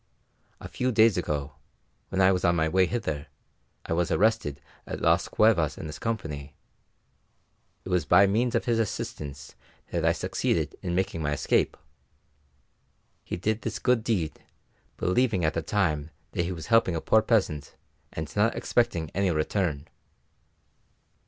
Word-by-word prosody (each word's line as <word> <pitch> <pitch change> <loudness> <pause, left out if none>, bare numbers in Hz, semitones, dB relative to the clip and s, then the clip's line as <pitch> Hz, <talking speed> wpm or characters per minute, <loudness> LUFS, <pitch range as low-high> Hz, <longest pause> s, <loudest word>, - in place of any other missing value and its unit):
A - - -8
few 125 0 -1
days 110 -3 +5
ago, 75 -5 -3 0.5
when 95 - 0
I 95 0 +6
was 90 -1 0
on 85 0 +3
my 80 -1 +2
way 95 +2 +3
hither, 80 -12 -3 0.6
I - - -2
was 85 0 +1
arrested 105 -10 +1 0.3
at - - -5
Las - - +2
Cuevas 95 -9 +3
in - - -7
his 75 -2 -7
company; 75 -11 -4 1.3
it - - -6
was 90 -2 +2
by 90 +5 +6
means 115 +5 +1
of 115 - 0
his 115 -2 +1
assistance 75 -9 -4 0.4
that - - -1
I - - +4
succeeded - - -1
in 85 -1 -2
making 90 -3 -1
my 75 -1 0
escape. 75 - +1 1.5
He - - -4
did 110 +5 -1
this 115 - -3
good 125 -3 +2
deed, 95 -10 -1 0.6
believing 95 -2 +1
at 80 - +1
the 80 - -1
time 80 -5 0 0.2
that 85 - -1
he 90 - -3
was 80 -3 -6
helping 115 -6 +4
a - - 0
poor 110 - +4
peasant, 95 - 0 0.4
and 80 -1 -6
not 105 +3 +2
expecting 115 -9 0
any 100 0 +1
return." 80 -2 -1
90 Hz, 155 wpm, -27 LUFS, 80-110 Hz, 1.5 s, I